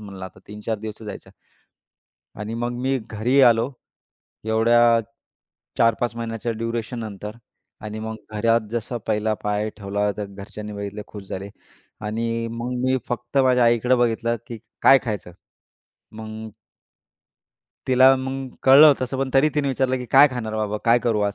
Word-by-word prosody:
म्हणलं 100 Hz, -3 st, -9 dB
आता 95 Hz, -, -11 dB
3-4 105 Hz, +1 st, -4 dB
दिवस 110 Hz, 0 st, -7 dB
तर -, -, -10 dB
जायचंय. 100 Hz, -, -8 dB, 1.1 s
आणि 105 Hz, +2 st, -5 dB
मग 120 Hz, +1 st, -2 dB
मी 135 Hz, +1 st, 0 dB
घरी 115 Hz, +4 st, +1 dB
आलो. 120 Hz, 0 st, +5 dB, 0.7 s
एवढ्या 110 Hz, +2 st, +3 dB, 1.0 s
4-5 115 Hz, 0 st, +2 dB
महिन्यांच्या 115 Hz, 0 st, -3 dB
ड्युरेशननंतर 115 Hz, -2 st, -5 dB, 0.5 s
आणि 105 Hz, 0 st, -5 dB
मग 110 Hz, 0 st, -5 dB, 0.2 s
घरात 115 Hz, +2 st, +3 dB
जसं 120 Hz, +1 st, -3 dB
पहिला 110 Hz, 0 st, 0 dB
पाय 105 Hz, +1 st, 0 dB
ठेवला 100 Hz, 0 st, -1 dB
तर 105 Hz, -, -4 dB
घरच्यांनी 100 Hz, +2 st, -9 dB
बघितले, 100 Hz, 0 st, -6 dB
खूश 105 Hz, -, -10 dB
झाले. 100 Hz, +2 st, -6 dB, 0.5 s
आणि 115 Hz, +2 st, -2 dB
मग 120 Hz, +2 st, -4 dB
मी 130 Hz, 0 st, +2 dB
फक्त 120 Hz, +3 st, -2 dB
माझ्या 125 Hz, -2 st, +4 dB
आईकडं 120 Hz, +2 st, +3 dB
बघितलं, 115 Hz, 0 st, +1 dB
की 115 Hz, -3 st, -7 dB, 0.2 s
काय 135 Hz, 0 st, +8 dB
खायचं? 105 Hz, -6 st, -4 dB, 0.8 s
मग 110 Hz, 0 st, -8 dB, 1.4 s
तिला 130 Hz, +1 st, +6 dB
मग 130 Hz, 0 st, -4 dB
कळलं 145 Hz, +3 st, +8 dB
तसं 130 Hz, +1 st, -3 dB
पण 135 Hz, -1 st, -1 dB
तरी 140 Hz, +3 st, +5 dB
तिने 145 Hz, -2 st, +1 dB
विचारलं, 130 Hz, -1 st, 0 dB
की 125 Hz, -1 st, -6 dB
"काय 140 Hz, +4 st, +7 dB
खाणार 110 Hz, -3 st, -4 dB
बाबा 105 Hz, -1 st, -1 dB
काय 120 Hz, +1 st, +5 dB
करू 110 Hz, -3 st, +1 dB
आज 100 Hz, -, -6 dB
115 Hz, 150 wpm, -23 LUFS, 105-125 Hz, 1.4 s, काय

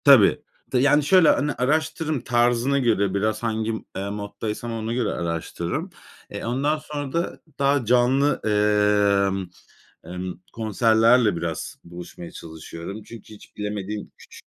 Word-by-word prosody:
Tabii. 140 Hz, 0 st, +6 dB, 0.3 s
Te 130 Hz, -, +2 dB
yani, 145 Hz, +3 st, +4 dB
şöyle; 165 Hz, +2 st, +5 dB
hani, 145 Hz, +1 st, +2 dB
araştırırım 155 Hz, +2 st, 0 dB
tarzına 120 Hz, +3 st, +2 dB
göre, 105 Hz, -6 st, +1 dB
biraz 110 Hz, +2 st, -1 dB
hangi, 110 Hz, -1 st, -1 dB, 0.2 s
eee, 100 Hz, +1 st, -3 dB
moddaysam 105 Hz, +3 st, -5 dB
ona 115 Hz, 0 st, -3 dB
göre 120 Hz, -3 st, 0 dB
araştırırım. 85 Hz, 0 st, -3 dB, 0.4 s
E, -, -, -6 dB
ondan 140 Hz, +6 st, 0 dB
sonra 145 Hz, -2 st, -6 dB
da 170 Hz, +1 st, -2 dB, 0.2 s
daha 140 Hz, -2 st, +2 dB
canlı, 125 Hz, +5 st, +3 dB
ımm, 105 Hz, -2 st, +2 dB, 0.6 s
ımm, 90 Hz, 0 st, -6 dB
konserlerle 115 Hz, 0 st, +3 dB
biraz 85 Hz, -1 st, -4 dB
buluşmaya 85 Hz, 0 st, -10 dB
çalışıyorum. 85 Hz, +5 st, -8 dB
Çünkü 110 Hz, 0 st, -12 dB
hiç 105 Hz, -, -16 dB
bilemediğim 105 Hz, 0 st, -4 dB
küçük -, -, -14 dB
110 Hz, 130 wpm, -24 LUFS, 100-130 Hz, 0.6 s, Tabii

